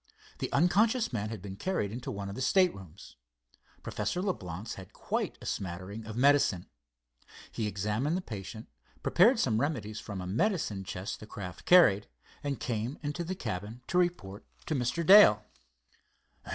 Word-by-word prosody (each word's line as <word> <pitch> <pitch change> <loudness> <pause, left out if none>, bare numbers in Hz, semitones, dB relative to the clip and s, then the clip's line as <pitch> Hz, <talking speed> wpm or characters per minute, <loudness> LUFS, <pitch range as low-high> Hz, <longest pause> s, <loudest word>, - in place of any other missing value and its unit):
The - - -3
unconscious 210 - +3
man 105 -2 -2
had 110 -4 -7
been 95 -2 -7
carried 105 - -1
into 120 +3 -6
one 100 -1 -5
of 100 - -5
the 130 - -6
staterooms. 100 - 0 0.7
Professor 180 - -2
Leblance 110 - -4
had 95 -2 -11
quite - - -3
a - - -11
smattering 95 +4 -5
of 110 0 -6
medicine. 135 -9 +3 0.9
He 110 - -2
examined 105 - -1
the - - -3
patient, 110 - -8 0.4
prepared 225 +8 +5
some 115 - +1
remedies 110 -8 -2
from 100 -3 -6
a 90 - -5
medicine 110 - 0
chest 90 +1 -5
the 105 - -11
craft 90 -5 -8
carried, 105 - +6 0.4
and 140 -2 -2
came 120 +3 -3
into 150 +4 -3
the 185 +3 -4
cabin 110 - -5
to 180 - +2
report 115 - -1 0.2
to - - -2
Mr. 130 +5 -1
Dale. 150 - +8
110 Hz, 155 wpm, -30 LUFS, 100-170 Hz, 0.9 s, Dale